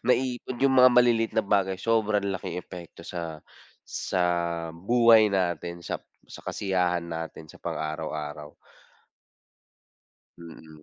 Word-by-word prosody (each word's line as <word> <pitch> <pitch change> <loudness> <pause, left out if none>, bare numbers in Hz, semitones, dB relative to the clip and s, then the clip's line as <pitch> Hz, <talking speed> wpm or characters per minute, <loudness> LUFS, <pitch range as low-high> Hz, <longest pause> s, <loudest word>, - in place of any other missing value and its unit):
Naipon 125 -1 0
yung 135 -1 +4
mga 125 0 +8
maliliit 120 -2 +4
na 110 - +2
bagay 95 -2 +1
sobrang 110 -3 +1
laking 95 -1 -4
epekto 90 -2 -11
sa, 80 -3 -6 0.4
sa 90 - -2 0.5
buhay 110 +4 +5
natin, 85 -2 -1
sa - - -3 0.3
sa - - -11
kasiyahan 90 -3 0
natin 80 -1 -6
sa - - -15
pang - - -4
araw-araw. 75 -1 -5 1.9
Mm. 80 -2 -13
95 Hz, 115 wpm, -27 LUFS, 80-115 Hz, 1.9 s, mga